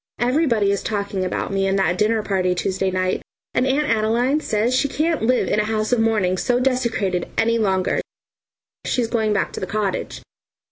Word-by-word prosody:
Everybody 240 Hz, -5 st, +2 dB
is 200 Hz, -, -1 dB
talking 200 Hz, -3 st, -2 dB
about 185 Hz, +1 st, -3 dB
me 195 Hz, 0 st, +1 dB
and 195 Hz, 0 st, +1 dB
that 190 Hz, -2 st, +2 dB
dinner 215 Hz, +3 st, +1 dB
party 185 Hz, -3 st, 0 dB
Tuesday 190 Hz, +1 st, -1 dB
night, 185 Hz, 0 st, -1 dB, 0.3 s
and 255 Hz, -, +1 dB
Aunt 290 Hz, +3 st, +1 dB
Adeline 230 Hz, +6 st, +1 dB
says 225 Hz, -3 st, 0 dB
she 285 Hz, -, +2 dB
can't 315 Hz, +3 st, -1 dB
live 245 Hz, +3 st, +2 dB
in 210 Hz, -, +1 dB
a -, -, +2 dB
house 215 Hz, +1 st, -1 dB
of 245 Hz, -, +3 dB
mourning 210 Hz, -5 st, +1 dB
so 245 Hz, 0 st, +1 dB
desecrated 235 Hz, -8 st, 0 dB
any 230 Hz, +1 st, +2 dB
longer; 190 Hz, -3 st, +1 dB, 0.8 s
she's 245 Hz, -2 st, 0 dB
going 220 Hz, -2 st, 0 dB
back 200 Hz, -, 0 dB
to -, -, -5 dB
the 185 Hz, -, -4 dB
cottage. 205 Hz, 0 st, -3 dB
215 Hz, 185 wpm, -21 LUFS, 195-245 Hz, 0.8 s, of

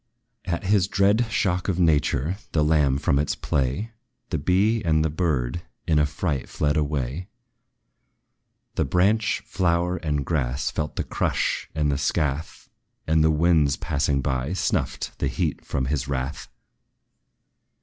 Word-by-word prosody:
At 85 Hz, +1 st, -2 dB
his 95 Hz, -1 st, +3 dB
dread 100 Hz, +4 st, +3 dB
shock 90 Hz, -4 st, 0 dB
of 95 Hz, -4 st, 0 dB
nature, 80 Hz, 0 st, +2 dB, 0.2 s
the 75 Hz, -, +3 dB
lamb 75 Hz, -3 st, +3 dB
from 70 Hz, -1 st, +1 dB
its 75 Hz, -, 0 dB
play, 70 Hz, -, -1 dB, 0.4 s
The 80 Hz, -, 0 dB
bee 100 Hz, +8 st, +2 dB
and 80 Hz, -2 st, +2 dB
the 80 Hz, -, 0 dB
bird, 75 Hz, -4 st, -1 dB, 0.2 s
in 80 Hz, -2 st, +3 dB
affright 75 Hz, -1 st, -1 dB
fled 75 Hz, 0 st, 0 dB
away; 75 Hz, +2 st, -1 dB, 1.5 s
The -, -, +1 dB
branch, 105 Hz, +4 st, +2 dB
flower, 90 Hz, -1 st, +1 dB
and 75 Hz, -4 st, -2 dB
grass, 70 Hz, -5 st, -1 dB
felt 75 Hz, -1 st, -3 dB
the -, -, -1 dB
crush -, -, -1 dB
and 75 Hz, -2 st, +1 dB
the 70 Hz, -, -1 dB
scath, 75 Hz, +2 st, -2 dB, 0.4 s
And 80 Hz, 0 st, +3 dB
the 80 Hz, -, +4 dB
winds 80 Hz, -2 st, +3 dB
passing 70 Hz, -2 st, 0 dB
by, 65 Hz, +5 st, -1 dB
snuffed 95 Hz, -, -2 dB
the -, -, +1 dB
heat -, -, -1 dB
of 65 Hz, -2 st, 0 dB
his 70 Hz, -1 st, -1 dB
wrath. 70 Hz, +1 st, -3 dB
75 Hz, 140 wpm, -24 LUFS, 70-90 Hz, 1.5 s, the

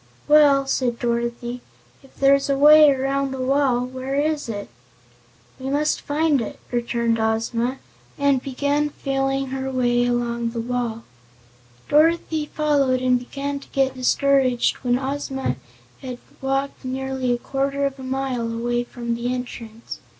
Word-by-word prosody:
"Well," 290 Hz, -2 st, +6 dB
said 250 Hz, -3 st, 0 dB
Dorothy, 235 Hz, +1 st, -2 dB, 0.4 s
"if 270 Hz, -, -21 dB
there's 275 Hz, 0 st, +3 dB
a 275 Hz, -, +2 dB
way 300 Hz, +1 st, +8 dB
around 275 Hz, 0 st, 0 dB
the 265 Hz, 0 st, -5 dB
wall, 255 Hz, -2 st, +2 dB
where 260 Hz, +1 st, -5 dB
is 295 Hz, -2 st, 0 dB
it?" 205 Hz, -2 st, -4 dB, 0.9 s
"We 260 Hz, +1 st, -4 dB
must 295 Hz, +2 st, 0 dB
find 295 Hz, -2 st, +1 dB
it," 225 Hz, -, -6 dB
returned 235 Hz, -1 st, 0 dB
Ozma, 230 Hz, +3 st, 0 dB, 0.4 s
and 280 Hz, -2 st, +2 dB
began 285 Hz, +3 st, 0 dB
feeling 270 Hz, -1 st, -1 dB
her 265 Hz, 0 st, -3 dB
way 245 Hz, -2 st, +1 dB
along 235 Hz, -1 st, -1 dB
the 230 Hz, 0 st, -5 dB
wall. 235 Hz, -1 st, -3 dB, 0.8 s
Dorothy 315 Hz, 0 st, +2 dB
followed 285 Hz, -5 st, +1 dB
and 250 Hz, -1 st, +2 dB
began 280 Hz, +3 st, -4 dB
to -, -, -15 dB
get 270 Hz, -1 st, +1 dB
discouraged 260 Hz, -1 st, +2 dB
when 245 Hz, -1 st, 0 dB
Ozma 270 Hz, 0 st, -3 dB, 0.4 s
had 255 Hz, -2 st, -6 dB, 0.2 s
walked 270 Hz, +1 st, -2 dB
nearly 260 Hz, 0 st, -2 dB
a 240 Hz, -, +1 dB
quarter 275 Hz, +2 st, -1 dB
of 275 Hz, -1 st, -3 dB
a -, -, -8 dB
mile 260 Hz, -3 st, -2 dB
away 240 Hz, +1 st, -1 dB
from 240 Hz, -1 st, -4 dB
the 235 Hz, +1 st, -2 dB
entrance. 235 Hz, -2 st, -6 dB
265 Hz, 145 wpm, -22 LUFS, 240-275 Hz, 0.9 s, way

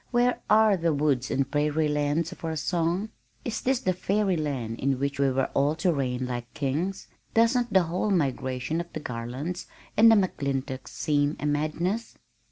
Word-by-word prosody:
Where 245 Hz, 0 st, +2 dB
are 215 Hz, -2 st, +5 dB
the 165 Hz, -3 st, +1 dB
'woods 140 Hz, -3 st, +1 dB
and 135 Hz, 0 st, 0 dB
prairie 150 Hz, +1 st, +1 dB
lands' 150 Hz, +2 st, 0 dB
of -, -, -12 dB
our 160 Hz, -1 st, -2 dB
song? 170 Hz, +5 st, 0 dB, 0.4 s
Is 225 Hz, -2 st, -2 dB
this 260 Hz, -1 st, +1 dB
the 185 Hz, -, +1 dB
'fairy 195 Hz, +1 st, +1 dB
land' 135 Hz, -8 st, -3 dB
in 135 Hz, 0 st, +1 dB
which 140 Hz, 0 st, -2 dB
we 140 Hz, -1 st, +4 dB
were 130 Hz, 0 st, 0 dB
all 145 Hz, +3 st, +2 dB
to 175 Hz, +1 st, +1 dB
'reign 130 Hz, -3 st, -1 dB
like 120 Hz, -1 st, -5 dB
kings'? 160 Hz, +8 st, -2 dB, 0.3 s
Doesn't 235 Hz, +1 st, +3 dB
the 190 Hz, -2 st, +5 dB
whole 175 Hz, +5 st, -1 dB
migration 135 Hz, -3 st, 0 dB
of 170 Hz, -, -10 dB
the -, -, -3 dB
Garlands 130 Hz, +7 st, -5 dB, 0.3 s
and 225 Hz, +2 st, +7 dB
McClintocks 140 Hz, -10 st, 0 dB
seem 145 Hz, 0 st, 0 dB
a -, -, -3 dB
madness?" 160 Hz, +9 st, -1 dB
155 Hz, 175 wpm, -27 LUFS, 135-185 Hz, 0.4 s, and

